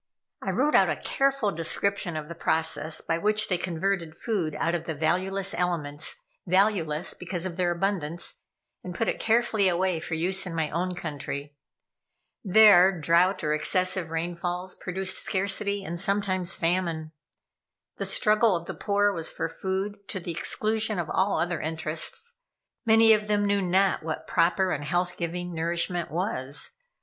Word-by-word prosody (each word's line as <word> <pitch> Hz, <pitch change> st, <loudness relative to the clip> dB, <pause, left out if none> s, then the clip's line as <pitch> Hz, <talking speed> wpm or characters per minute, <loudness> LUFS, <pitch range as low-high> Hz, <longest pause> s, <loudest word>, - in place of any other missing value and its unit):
I -, -, -3 dB
wrote 295 Hz, +4 st, +1 dB
out -, -, +5 dB
a -, -, 0 dB
careful 275 Hz, -6 st, 0 dB
description 170 Hz, +2 st, -1 dB
of 150 Hz, -1 st, -5 dB
the 170 Hz, -, -6 dB
processes 160 Hz, -1 st, 0 dB
by 165 Hz, -, +1 dB
which 215 Hz, +3 st, +1 dB
they 180 Hz, -, +2 dB
converted 175 Hz, -1 st, -2 dB
food 185 Hz, -10 st, -2 dB
out 165 Hz, -, 0 dB
of 175 Hz, -, -2 dB
the 160 Hz, -, -3 dB
valueless 185 Hz, +5 st, 0 dB
elements 155 Hz, -4 st, -1 dB, 0.3 s
valueless 180 Hz, -4 st, +1 dB
because 180 Hz, -1 st, -5 dB
of 180 Hz, -2 st, -4 dB
their 180 Hz, -1 st, +1 dB
abundance 175 Hz, -2 st, -2 dB, 0.4 s
and 180 Hz, -1 st, -7 dB
put 225 Hz, -, -1 dB
it -, -, -1 dB
carefully 225 Hz, -3 st, +2 dB
away 180 Hz, -1 st, +1 dB
for 165 Hz, +1 st, -4 dB
use 185 Hz, +3 st, 0 dB
in 170 Hz, -, -5 dB
my 160 Hz, -2 st, -1 dB
own 180 Hz, +3 st, -2 dB
country. 145 Hz, -3 st, -6 dB, 0.9 s
There 195 Hz, -2 st, +7 dB
drouth, 175 Hz, +4 st, +3 dB
or 150 Hz, 0 st, +1 dB
excessive 185 Hz, +2 st, 0 dB
rainfalls, 175 Hz, +2 st, -3 dB
produced 190 Hz, +1 st, 0 dB
scarcity, 200 Hz, +1 st, 0 dB
and 170 Hz, -1 st, -4 dB
sometimes 190 Hz, -2 st, +1 dB
famine. 165 Hz, -2 st, -1 dB, 0.9 s
The -, -, -2 dB
struggle 215 Hz, -1 st, +3 dB
of 170 Hz, 0 st, -4 dB
the -, -, -5 dB
poor 205 Hz, 0 st, +1 dB
was 165 Hz, -3 st, -3 dB
for -, -, -3 dB
food, 190 Hz, +4 st, -3 dB
to 190 Hz, -, -4 dB
the 170 Hz, -1 st, -5 dB
exclusion 215 Hz, +5 st, -1 dB
of 170 Hz, -3 st, -3 dB
all 195 Hz, +1 st, +1 dB
other 175 Hz, -1 st, -1 dB
interests. 160 Hz, -, -3 dB, 0.5 s
Many 225 Hz, 0 st, +7 dB
of 210 Hz, -1 st, 0 dB
them 205 Hz, -1 st, +1 dB
knew 200 Hz, 0 st, +2 dB
not 190 Hz, +1 st, +2 dB
what 155 Hz, 0 st, -5 dB
proper 180 Hz, +2 st, +2 dB
and 145 Hz, -, -2 dB
health 175 Hz, +4 st, 0 dB
giving 175 Hz, +1 st, -4 dB
nourishment 170 Hz, +1 st, 0 dB
was. 150 Hz, -6 st, -2 dB
180 Hz, 160 wpm, -27 LUFS, 165-200 Hz, 0.9 s, There